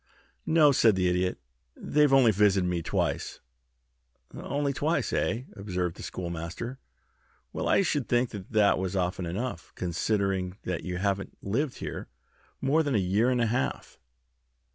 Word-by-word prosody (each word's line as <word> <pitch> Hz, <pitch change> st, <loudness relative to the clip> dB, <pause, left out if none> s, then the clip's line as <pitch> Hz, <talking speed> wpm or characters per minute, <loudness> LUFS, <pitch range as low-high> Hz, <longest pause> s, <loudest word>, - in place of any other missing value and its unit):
"No," 155 Hz, -3 st, +6 dB
said 115 Hz, -5 st, +4 dB
the 90 Hz, -1 st, +1 dB
Idiot. 90 Hz, +1 st, 0 dB, 0.4 s
"They've 150 Hz, -1 st, +2 dB
only 130 Hz, -4 st, +6 dB
visited 100 Hz, -2 st, +3 dB
me 90 Hz, -1 st, -1 dB
twice." -, -, -2 dB, 0.9 s
"Only 140 Hz, 0 st, -2 dB
twice, 155 Hz, +5 st, 0 dB
eh?" 115 Hz, +3 st, 0 dB
observed 90 Hz, -4 st, -3 dB
the -, -, -10 dB
Schoolmaster. 85 Hz, +9 st, -5 dB, 0.7 s
"Well, -, -, -2 dB
I -, -, +4 dB
should 145 Hz, -7 st, -1 dB
think 120 Hz, 0 st, +2 dB
that 105 Hz, 0 st, +1 dB
was 95 Hz, 0 st, -2 dB
often 90 Hz, -1 st, -1 dB
enough, 95 Hz, -1 st, -4 dB
considering 95 Hz, +1 st, -1 dB
that 90 Hz, -2 st, -3 dB
you 90 Hz, -1 st, -3 dB
haven't 100 Hz, +1 st, -2 dB
lived 125 Hz, +7 st, -1 dB
here -, -, -6 dB, 0.5 s
more 140 Hz, +4 st, +3 dB
than 145 Hz, -5 st, 0 dB
a -, -, +4 dB
year 100 Hz, +5 st, +2 dB
and 125 Hz, -1 st, +1 dB
a -, -, +3 dB
half." 120 Hz, +4 st, -2 dB
100 Hz, 145 wpm, -28 LUFS, 90-130 Hz, 0.9 s, No